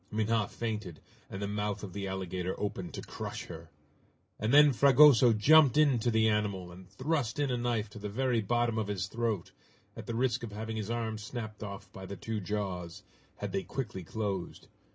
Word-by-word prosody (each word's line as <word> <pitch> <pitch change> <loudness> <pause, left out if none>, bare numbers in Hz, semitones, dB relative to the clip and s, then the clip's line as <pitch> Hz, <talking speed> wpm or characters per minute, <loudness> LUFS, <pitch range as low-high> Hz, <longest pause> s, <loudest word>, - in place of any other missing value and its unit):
Minha 110 -1 +1
fainted, 105 -8 -4 0.3
and 95 - -6
the 100 - -2
mouth 105 0 -2
of 95 -3 -7
the 100 0 -4
alligator 95 -1 -3
opened 95 -4 -3
to - - -6
crush - - -6
her! - - -10 0.7
And 110 +2 0
then 145 0 +7
Fragoso 135 -2 +7
jumped 140 +5 +6
in 145 -5 +4
to 120 - +1
the 110 -1 +3
animal, 100 -4 -1
and 90 +1 -13
thrust 130 - -1
in 145 -2 0
a 125 - 0
knife 120 -3 -1
to 105 - -9
the 105 0 -5
very 125 +1 +1
bottom 120 +1 +1
of 110 - -2
his 100 -2 -2
throat, 115 -6 -2 0.4
at - - -9
the 115 - -3
risk 125 0 +1
of 115 -3 -7
having 110 +1 -4
his 105 -1 -4
arm 115 -2 -2
snapped 110 0 -6
off 100 -2 -8
by 95 -1 -8
the 100 - -7
two 110 +5 -3
jaws, 95 -4 -4 0.3
had - - -5
they 95 - -1
quickly 105 -5 -5
closed. 100 -1 -4
110 Hz, 195 wpm, -31 LUFS, 100-120 Hz, 0.7 s, then